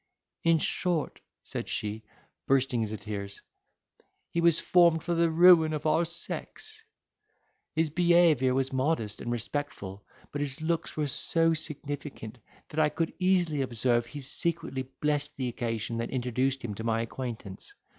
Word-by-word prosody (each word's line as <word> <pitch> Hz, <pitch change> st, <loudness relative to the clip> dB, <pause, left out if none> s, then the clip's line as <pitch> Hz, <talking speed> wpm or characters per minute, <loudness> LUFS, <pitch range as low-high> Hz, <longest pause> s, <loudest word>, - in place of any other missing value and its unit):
"In 165 Hz, 0 st, +5 dB
short," 165 Hz, -1 st, -1 dB, 0.2 s
said -, -, -5 dB
she, 105 Hz, +1 st, -3 dB, 0.5 s
bursting 130 Hz, -3 st, +2 dB
into 110 Hz, 0 st, -3 dB
tears, 100 Hz, -1 st, -6 dB, 0.9 s
"he 170 Hz, -, 0 dB
was 170 Hz, -1 st, +4 dB
formed 170 Hz, -3 st, +4 dB
for 175 Hz, -, -1 dB
the 170 Hz, 0 st, +3 dB
ruin 165 Hz, -1 st, +6 dB
of 150 Hz, +1 st, -4 dB
our 155 Hz, +2 st, +3 dB
sex. 435 Hz, -, -6 dB, 0.9 s
His 160 Hz, -1 st, +1 dB
behaviour 170 Hz, -6 st, +4 dB
was 135 Hz, 0 st, 0 dB
modest 130 Hz, -6 st, 0 dB
and 120 Hz, -, -3 dB
respectful, 115 Hz, -5 st, -4 dB, 0.3 s
but 145 Hz, -, -3 dB
his 145 Hz, +1 st, -3 dB
looks 165 Hz, +1 st, -2 dB
were 150 Hz, -, +1 dB
so 165 Hz, +4 st, +2 dB
significant, 145 Hz, -6 st, -5 dB, 0.3 s
that 155 Hz, -, -3 dB
I 155 Hz, -1 st, +4 dB
could 165 Hz, +1 st, -2 dB
easily 180 Hz, -6 st, +2 dB
observe 120 Hz, -1 st, +1 dB
he 145 Hz, +4 st, -7 dB
secretly 135 Hz, -2 st, -1 dB
blessed 150 Hz, 0 st, 0 dB
the 130 Hz, -2 st, -1 dB
occasion 115 Hz, -1 st, -3 dB
that 115 Hz, -, -2 dB
introduced 130 Hz, +1 st, -1 dB
him 105 Hz, -, -3 dB
to 110 Hz, -, -6 dB
my 115 Hz, 0 st, +1 dB
acquaintance. 115 Hz, -5 st, -7 dB
145 Hz, 145 wpm, -29 LUFS, 120-165 Hz, 0.9 s, ruin